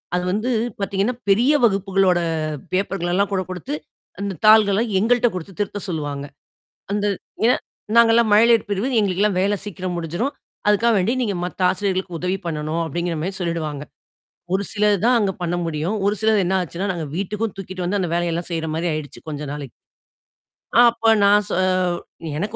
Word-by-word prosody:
அது 180 - 0
வந்து 215 +6 -1 0.3
பாத்தீங்கன்னா, 200 +4 0
பெரிய 240 +9 +4
வகுப்புகளோட 195 -3 +2 0.6
பேப்பர்கள் 190 -2 -1
எல்லாம் 200 +2 +1
கூட 190 - +1
குடுத்து, 180 -5 -5 0.5
அந்த 200 -3 -3
தாள்கள்லாம் 215 +1 +5
எங்கள்ட்ட 240 +3 +3
குடுத்து 180 +1 -7
திருத்த 205 0 -3
சொல்லுவாங்க. 145 -4 -3 0.7
அந்த 205 0 0 0.4
ஏன்? - - +2 0.4
நாங்கல்லாம் 230 -1 +5
மழலையர் 230 0 +5
பிரிவு, 205 +6 0
எங்களுக்கெல்லாம் 200 -1 +1
வேல 200 +1 +2
சீக்கிரம் 185 -2 -4
முடிஞ்சுரும். 175 - -2 0.3
அதுக்காக 225 +3 +4
வேண்டி, 190 +6 +1
"நீங்க 205 -5 -1
மத்த 180 +1 -7
ஆசிரியர்களுக்கு 190 -3 -2
உதவி 180 +1 0
பண்ணணும்" 155 0 -2
அப்படிங்கிற 170 +2 -2
மாரி 190 +3 -3
சொல்லிடுவாங்க. 160 -5 -3 0.7
ஒரு 195 +1 +1
சிலர் 210 -1 +2
தான் 245 0 +5
அங்க 200 -3 +1
பண்ண 175 0 -1
முடியும். 165 +5 -2
ஒரு 205 - +1
சிலர் 220 -2 +3
என்னா 190 +1 +1
ஆச்சுன்னா, 180 +4 -4
நாங்க 165 -3 -4
வீட்டுக்கும் 210 +3 -3
தூக்கிட்டு 185 -1 -5
வந்து, 200 +3 0
அந்த 175 - -1
வேலையெல்லாம் 170 0 -1
செய்ற 165 -1 -2
மாரி 170 +2 -1
ஆயிடுச்சு, 150 -3 -6
கொஞ்ச 150 -1 -5
நாளைக்கு. 145 -4 -7 1.0
அ - - +2
அப்ப 230 -1 +1
நான் 205 +1 +5
சொ - - -2 0.8
"எனக்கு 205 +7 -3
195 Hz, 160 wpm, -21 LUFS, 175-210 Hz, 1.0 s, தாள்கள்லாம்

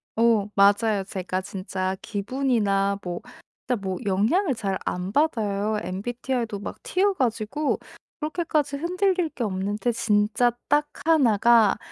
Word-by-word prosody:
어 225 -3 +3
맞아요. 200 +1 +4
제가 185 0 -3
진짜 190 0 -3
기분이나 205 -3 0
뭐 175 -1 -4 0.5
진짜 245 -4 0
뭐 190 -1 -3
영향을 245 - +2
잘 195 -3 -2
안 180 +2 -3
받아요. 215 -7 +1
MBTI도 230 +2 -3
막 - - -7
T여 395 +2 +2
가지고 250 - -1 0.4
그렇게까지 305 -2 -1
흔들릴 360 +1 +1
게 245 - -5
없는데 205 +4 -1
진짜 220 +2 +2 0.2
딱 295 +1 +3 0.2
1 275 -11 +4
가 230 -2 +5
220 Hz, 255 characters per minute, -25 LUFS, 200-275 Hz, 0.5 s, 가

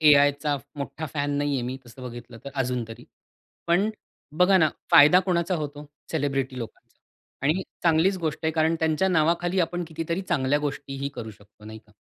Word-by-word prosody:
एआयचा 145 -1 +5 0.2
मोठा 140 +3 -4
फॅन 145 -1 0
नाहीये 145 -3 0
मी, 125 +2 -3
तसं 120 +2 -13
बघितलं, 120 -1 -9
तर 140 - -6
अजून 125 -2 -1
तरी. 115 +2 -10 0.6
पण 180 +5 +3 0.5
बघा 185 +1 +6
ना, 160 -3 +5 0.2
फायदा 150 +5 +8
कोणाचा 180 -1 0
होतो? 150 -2 -5 0.2
सेलिब्रिटी 135 -4 -1
लोकांचा 115 -2 -9 0.5
आणि 170 +6 +2 0.2
चांगलीच 170 +3 +3
गोष्ट 160 -3 -2
आहे, 160 - +1
कारण 160 +1 +2
त्यांच्या 160 +4 +2
नावाखाली 175 +2 +2
आपण 175 +1 -1
कितीतरी 165 +3 -3
चांगल्या 145 -6 +1
गोष्टीही 140 -1 -4
करू 110 -1 -6
शकतो, 105 +1 -19
नाही 110 +1 -9
का? 105 - -23
150 Hz, 165 wpm, -25 LUFS, 135-170 Hz, 0.6 s, फायदा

